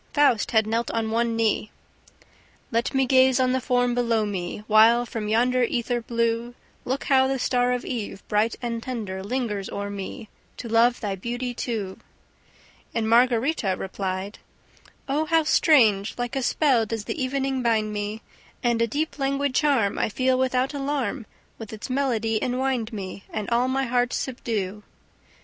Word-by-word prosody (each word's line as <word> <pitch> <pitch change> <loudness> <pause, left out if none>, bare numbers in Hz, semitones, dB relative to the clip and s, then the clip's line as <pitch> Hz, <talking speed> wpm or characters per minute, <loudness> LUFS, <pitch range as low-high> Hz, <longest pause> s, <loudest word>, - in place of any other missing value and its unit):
Faust 280 -7 +3
had 220 -2 +3
knelt 230 +2 -1
on 225 -1 -1
one 230 0 +1
knee: 220 -1 +1 1.0
"Let 235 +4 0
me 265 0 +3
gaze 260 0 +4
on 255 -1 +3
the 260 0 0
form 245 -1 +1
below 230 -3 +1
me, 190 0 -4
While 225 +3 +5
from 220 -2 -5
yonder 245 +4 +2
ether 240 0 0
blue 235 +1 -1 0.3
Look 260 +2 -2
how 265 -1 +4
the 270 0 0
star 250 0 +1
of 250 0 -2
eve, 220 -5 -5
bright 215 +2 +1
and 230 -1 -2
tender, 215 -7 -5
lingers 210 -3 -2
o'er 200 0 -4
me, 200 +4 -6 0.3
To 235 - -6
love 230 +2 +3
thy 205 -3 -2
beauty 245 +5 -4
too!" 215 -6 -4 1.0
And 225 -1 0
Margarita 235 -2 +3
replied: 190 +1 -4 0.7
"Oh, 295 +3 0
how 325 0 +3
strange! 225 -10 +4
Like 245 +2 -3
a 270 - 0
spell 250 -3 +2
does 225 -1 -4
the 285 - -3
evening 265 0 -1
bind 220 -3 +1
me! 210 +2 -4 0.4
And 235 -1 +2
a 230 - +3
deep 300 +6 -3
languid 275 0 0
charm 260 -8 +2
I - - +1
feel 255 +4 +1
without 260 +1 0
alarm 275 -4 -2 0.3
With 225 -2 -8
its 220 +3 -7
melody 230 -5 0
enwind 250 -2 -1
me 195 -2 -7
And 210 - -4
all 240 +2 +3
my 265 +1 0
heart 245 0 0
subdue." 215 -6 -3
235 Hz, 165 wpm, -24 LUFS, 220-260 Hz, 1.0 s, While